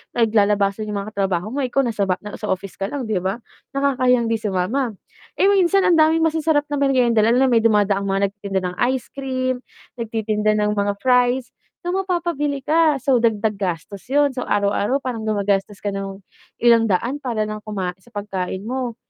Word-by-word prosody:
naglalabasan 210 -2 +2
'yong 205 -1 -2
mga - - -7
trabaho 195 +1 -1
mo 285 - -3
ikaw 270 +2 +1
nasa 210 -5 -1
ba 185 - +2
nasa 210 - -8
nasa 215 - -5
office 190 +1 -9
ka 195 - -1
lang, 275 +2 -4
'di 195 -4 +1
ba? 195 +6 -3 0.3
nakakahiyang 255 -3 +2
'di 225 - +1
sumama, 215 +5 -1 0.4
eh, - - +3
minsan 385 0 +3
ang 340 -2 +4
daming 320 +1 +4
masasarap 315 -2 +1
na 290 - 0
meryenda, 250 -5 +3
lalo 235 +2 +3
na 265 - +3
may 230 - +5
dumadaang 205 -3 +2
mga 195 0 +1
nagtitinda 200 -2 -3
ng - - -11 0.2
ice 255 - -6
cream, 255 -2 -2 0.4
nagtitinda 215 -2 0
ng 210 0 +1
mga 205 0 0
fries, 250 0 +2 0.3
so 350 - -4
mapapabili 345 -7 -1
ka, 310 -1 +3
so 270 -1 +2
dagdag 220 -2 +1
gastos 185 +1 -4
'yun, 285 0 +3
so 250 - -2
araw-araw 205 +6 +1
parang 235 -4 -4
gumagastos 200 -1 0
ka 205 - -2
ng 195 0 -5 0.4
ilang 230 -1 +5
daan 235 +9 0
para 230 -4 -1
lang 215 0 -5
kumain 190 -4 -3
sa 240 - -21
pagkain 195 -2 -4
mo, 250 -1 -3
225 Hz, 185 wpm, -21 LUFS, 200-265 Hz, 0.4 s, may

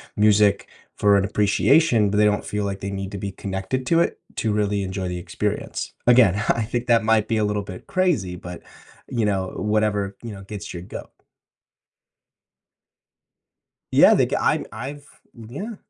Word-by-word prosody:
music 105 -1 +3 0.3
for 100 -1 +4
an 100 - +1
appreciation, 110 +4 +3
but 105 - 0
they 105 - +5
don't 105 0 +1
feel 105 -1 -2
like 100 -1 -3
they 100 +1 -5
need 95 0 -5
to 100 - -5
be 100 +1 -4
connected 95 +6 -4
to 165 - +3
it 170 - 0 0.2
to 110 -2 -1
really 105 -1 0
enjoy 95 0 -4
the 90 0 -4
experience. 85 - -4
Again, 120 -6 +6
I 115 - +2
think 120 +2 -3
that 115 -2 +4
might 110 -1 +2
be 115 - 0
a 110 - +1
little 105 0 -1
bit 95 -2 -10
crazy, 160 - 0
but, 90 0 -9 0.5
you 115 -3 0
know, 95 -2 0
whatever, 105 -2 0
you 115 - -7
know, 100 -1 -9
gets 100 0 -8
your 85 -1 -7
goat. - - -9 2.8
Yeah, - - +7
the - - +3
g - - -2
I'm - - +1
I've 145 +2 -7 0.3
Yeah. 135 - -7
105 Hz, 175 wpm, -23 LUFS, 100-115 Hz, 2.8 s, Yeah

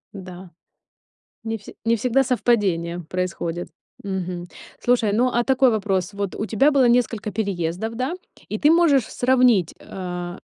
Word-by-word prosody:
Н-да. 185 -1 -9 0.9
Не 225 0 -3
все 205 - -13
не 230 0 +3
всегда 250 +4 +2
совпадения 195 -9 +1
происходят. 175 -1 -3 0.3
Мгм. 180 -2 -4 0.3
Слушай, 245 -4 +2
ну, 245 +4 +3
а 240 0 +1
такой 260 -1 +3
вопрос. 195 -3 -1
Вот 200 -1 -4
у 215 - -3
тебя 270 +8 +3
было 265 -3 +4
несколько 235 -3 +1
переездов, 195 +1 -2
да, 255 +7 -2 0.3
и 215 - -3
ты 300 +6 +4
можешь 300 -8 +4
сравнить, 245 -8 +3
э, - - -16
а 180 -1 -6
215 Hz, 150 wpm, -22 LUFS, 185-245 Hz, 0.9 s, было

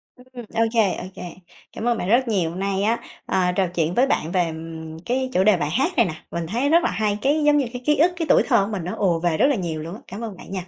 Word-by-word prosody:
Ừm, 250 -2 -12
ô 225 - +1
kê, 215 -5 +3
ô - - -6
kê. - - -8 0.5
Cảm - - -6
ơn 235 - +2
bạn 180 - -3
rất 245 +2 +3
nhiều 185 -7 +1
hôm 175 +3 -7
nay 195 0 -1
á, 230 +3 +1 0.3
ờ, 180 -1 +1
trò 190 -2 +2
chuyện 170 -1 -1
với 260 +3 +4
bạn 165 - 0
về 175 -3 0 0.5
cái 260 +1 -1
chủ 185 - +3
đề 210 -3 +5
bài 145 -2 -1
hát 270 - +1
này 235 - +5
nè, 160 - -3 0.2
mình 170 -1 -3
thấy 245 - 0
rất 335 +2 +4
là - - +1
hay, 210 -1 0
cái 295 +2 +2
giống 295 0 +4
như 275 - +2
cái 245 - -6
ký 300 0 +4
ức, 335 +5 +4
cái 335 - -2
tuổi - - +5
thơ 235 -7 +3
của 220 - -6
mình 190 -5 -3
nó 180 - -4
ồ 175 -4 +1
về 170 -2 0
rất - - +4
là 280 - +2
nhiều 165 -5 -3
luôn 170 +4 -7
á. - - -12
Cảm 200 +5 -8
ơn 205 -5 -6
bạn - - -12
nha. 185 -2 -5
205 Hz, 305 wpm, -22 LUFS, 180-255 Hz, 0.5 s, đề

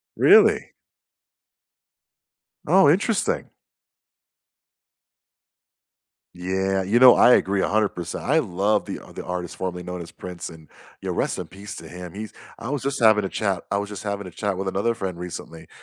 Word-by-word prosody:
Really? - - +5 2.0
Oh, 175 -3 +6
interesting. 200 +6 0 2.9
Yeah, 95 +2 -1
you 100 +5 +1
know, 125 0 +9
I 125 - +6
agree 100 -3 +2
100%. 100 -5 -1
I 155 +5 +3
love 100 - 0
the - - -5 0.2
the - - -7
artist 90 -1 -5
formerly 90 -1 -4
known 90 0 -6
as 85 - -10
Prince, 90 -2 -8
and, 80 -2 -14 0.3
yeah, - - -4
rest - - -1
in - - -5
peace 100 +2 -10
to 80 - -10
him. 90 +1 -9
He's 110 +1 -7 0.2
I 115 +2 -7
was 145 -2 -2
just 140 +1 -2
having 110 -3 +5
a 95 - -2
chat 100 -4 -2
I 100 - 0
was 100 0 -3
just 105 -2 -7
having 100 -1 -4
a 90 - -9
chat 100 -1 -3
with 95 0 -3
another 105 +5 0
friend 95 -3 -5
recently 85 -2 -8
95 Hz, 160 wpm, -23 LUFS, 90-110 Hz, 2.9 s, know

